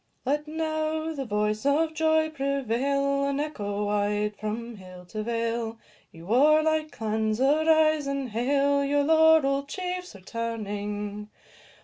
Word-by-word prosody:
Let 295 +3 0
now 315 0 -2
the 275 -3 -4
voice 210 -1 -1
of 310 +3 +2
joy 315 0 +2
prevail, 275 0 0
And 280 0 -1
echo 210 -9 -3
wide 205 0 0
from 225 +2 -5
hill 185 -1 -12
to 215 +4 -5
vale; 230 0 -2 0.3
Ye 165 - -13
warlike 305 - +3
clans, 220 0 -1
arise 310 +1 +3
and 275 -2 -2
hail 280 +5 +1
Your 285 +1 +1
laurell'd 315 -3 +4
chiefs 360 - -5
returning. 210 -1 -5
275 Hz, 120 wpm, -26 LUFS, 215-310 Hz, 0.3 s, laurell'd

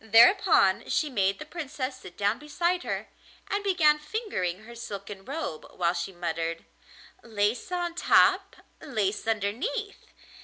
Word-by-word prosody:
Thereupon 225 - +5
she 300 -2 +1
made 195 -4 +1
the - - -8
Princess 280 -5 -5
sit 185 -8 -12
down 205 +3 +1
beside 345 +5 0
her, - - -4 0.4
and 405 0 0
began 320 -6 +4
fingering 300 - -3
her 235 +2 -11
silken 200 -4 -7
robe, 275 - -5
while 170 -1 +1
she 170 +2 -3
muttered 165 -2 -3 0.6
'Lace 220 - -1
on 350 -1 -1
top, 345 - +4 0.3
lace 215 -8 -2
underneath! 255 - -2
235 Hz, 130 wpm, -28 LUFS, 195-325 Hz, 0.6 s, Thereupon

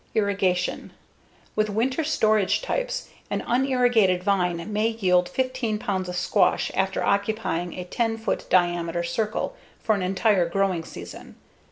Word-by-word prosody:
Irrigation: 195 -4 0 0.6
With 215 0 +1
winter 255 +9 0
storage 215 - +2
types, - - -2 0.2
an - - -2
unirrigated 245 -7 +3
vine 180 -1 0
may 215 +2 +2
yield 185 -6 +2
15 255 -4 -1
pounds 190 -4 -2
of 180 - -4
squash 180 +1 +2
after 190 0 0
occupying 200 -4 0
a 180 - -4
10 225 +5 -1
foot 225 - -3
diameter 175 -1 +1
circle 215 - -2 0.2
for 220 - +1
an 200 - -1
entire 185 -1 +2
growing 185 -2 0
season. 85 - -10
200 Hz, 135 wpm, -25 LUFS, 180-225 Hz, 0.6 s, unirrigated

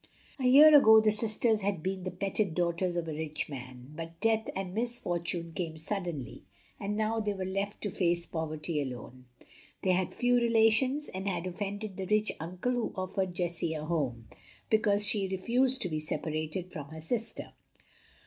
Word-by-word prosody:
A 260 - -1
year 295 +4 +9
ago 220 -6 +9
the 215 0 +4
sisters 215 0 +1
had 195 -5 -1
been 190 0 -3
the - - -1
petted 195 -1 -1
daughters 175 0 0
of 170 -1 -2
a 160 - -3
rich 155 0 -3
man; 130 -1 -9
but 165 0 -7
death 225 0 +1
and 190 -1 -4
misfortune 175 -7 -2
came 160 0 -4
suddenly, 170 - -4 0.4
and 205 +1 -2
now 220 +1 0
they 210 -2 -1
were 190 -1 -3
left 195 +2 -3
to 205 - -2
face 175 -2 +1
poverty 155 -1 -3
alone. 125 -1 -7 0.6
They 185 - +3
had 185 0 +1
few 245 0 +2
relations, 235 +5 +3
and 190 +1 -5
had 175 -2 -2
offended 200 +2 -4
the 190 -1 -4
rich 215 +1 +2
uncle 180 +9 -2
who 245 -2 -1
offered 185 -1 -2
Jessie 170 -2 -1
a 155 0 -4
home, 135 -9 -2 0.4
because 210 -1 +3
she 200 -1 +1
refused 245 +8 +1
to 180 - -2
be 155 -1 -2
separated 155 +3 -3
from 150 -5 -6
her 160 0 -9
sister. 225 +8 -3
185 Hz, 175 wpm, -30 LUFS, 165-215 Hz, 0.6 s, year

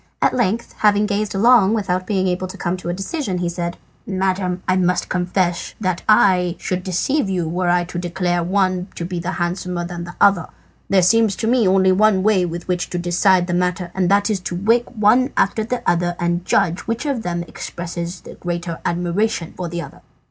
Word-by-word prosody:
At - - +2
length, 235 -1 -1
having 210 0 +4
gazed 210 -1 -2
long 225 0 +5
without 185 -3 -1
being 190 -3 +1
able 185 +1 -1
to 185 - -10
come 175 0 -1
to 180 - -6
a - - +1
decision, 195 - -3
he 175 0 -1
said 170 0 -4 0.3
"Madam, 185 -1 -1
I 185 - +3
must 180 -1 +1
confess 180 -1 -1
that 185 -4 -1
I 185 -4 +4
should 185 0 -3
deceive 195 - 0
you 180 -3 -1
were 175 +2 -1
I 175 0 +3
to 175 0 -6
declare 175 0 -1
one 185 0 0
to 170 - -4
be 175 -1 -4
handsomer 175 0 -3
than 175 0 -6
the 175 - -10
other. 195 -4 +4 0.4
There 190 -2 +4
seems 220 +2 +3
to 220 - -2
me 235 -3 +3
only 190 0 +4
one 195 0 +3
way 210 -3 +3
in 175 - -1
which 175 +1 -3
to 180 - -3
decide 175 +1 +2
the 175 - -3
matter, 180 0 -1
and 185 -2 0
that 205 +2 +3
is 205 - 0
to 180 -1 -5
wake 230 +6 +2
one 245 +4 +2
after 215 +3 +2
the 245 +3 -4
other 175 0 +1
and 175 +1 -1
judge 170 +1 +2
which 230 +5 -2
of 275 -5 -1
them 175 -3 -3
expresses 170 +1 -6
the - - -11
greater 175 -1 -4
admiration 175 +1 -1
for 180 -2 -4
the 170 0 -4
other." - - -12
185 Hz, 205 wpm, -20 LUFS, 175-200 Hz, 0.4 s, long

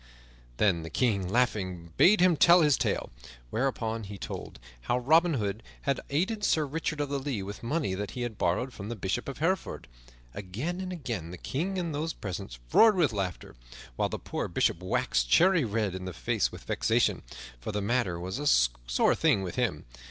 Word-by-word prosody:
Then 95 -6 +2
the 80 - -7
King 100 -2 0
laughingly 95 -8 0
bade 205 +1 +6
him 180 -2 +5
tell 170 +3 +7
his 150 -3 +5
tale, 115 -7 -1 0.4
whereupon 115 -3 -1
he 100 0 -8
told - - -7 0.3
how 120 - +3
Robin 160 +6 +4
Hood 105 -2 -2 0.2
had 140 -1 0
aided 190 +9 -1
Sir 155 -2 +2
Richard 155 +1 -3
of 145 -1 -1
the 140 -1 -1
Lea 130 -7 -3
with 100 +2 -7
money 140 - -1
that 100 +2 -3
he 125 - -2
had 120 -3 -4
borrowed 120 +9 0
from 100 +1 -7
the 120 - -3
Bishop 105 +6 -2
of 135 - -6
Hereford. 170 - -1 0.5
Again 120 - -4
and 185 -1 -4
again 120 - -4
the 90 - -8
King 180 - -3
and 170 -3 -2
those 155 +3 -2
present 95 - -6 0.2
roared 225 -2 +7
with 160 -10 +2
laughter, 95 -3 -4 0.4
while - - 0
the - - -3
poor - - -4
Bishop 85 - 0
waxed - - 0
cherry 180 - +5
red 105 -3 -1
in 95 0 -6
the 95 - -5
face - - 0
with - - -10
vexation, - - +1 0.4
for - - -5
the 105 - -2
matter 100 -4 0
was 95 +8 -4
a 145 - -2 0.4
sore - - +4
thing 95 - +2
with 90 - -4
him. - - -1
120 Hz, 195 wpm, -29 LUFS, 95-155 Hz, 0.5 s, tell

